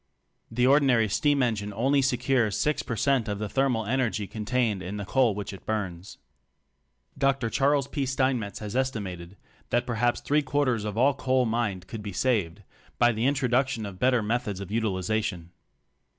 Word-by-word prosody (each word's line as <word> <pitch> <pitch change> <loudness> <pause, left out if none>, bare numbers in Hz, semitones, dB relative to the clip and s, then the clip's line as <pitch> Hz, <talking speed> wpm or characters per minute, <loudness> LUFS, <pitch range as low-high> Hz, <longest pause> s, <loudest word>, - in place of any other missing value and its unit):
The 125 +2 +1
ordinary 130 -5 +4
steam 145 +6 +2
engine 105 -4 -1
only 135 +7 +2
secures 125 -4 +1
6 150 0 +1
per 115 - -4
cent 125 0 +1
of 105 -1 -2
the 105 +1 -3
thermal 125 -2 0
energy 115 -3 0
contained 110 +1 -1
in 95 +3 -5
the 100 - -5
coal 120 -1 +2
which 105 0 -5
it 95 - -11
burns. 95 -4 -4 1.0
Dr. 135 -4 +1
Charles 140 -1 +2
P. 140 -3 -2
Steinmetz 130 -5 0
has 105 +1 -6
estimated 100 -8 -3 0.3
that 120 0 +1
perhaps 120 0 0
three 150 +1 +1
quarters 130 -5 0
of 105 0 -4
all 135 +4 +4
coal 130 -2 +1
mined 110 -5 -1
could 110 +2 -7
be 100 -2 -6
saved 105 -5 0 0.3
by 120 0 +4
the 115 +3 0
introduction 130 -3 +1
of 95 -2 -8
better 125 -3 +3
methods 110 -3 -2
of 100 0 -7
utilization. 100 -4 -1
115 Hz, 165 wpm, -27 LUFS, 105-130 Hz, 1.0 s, ordinary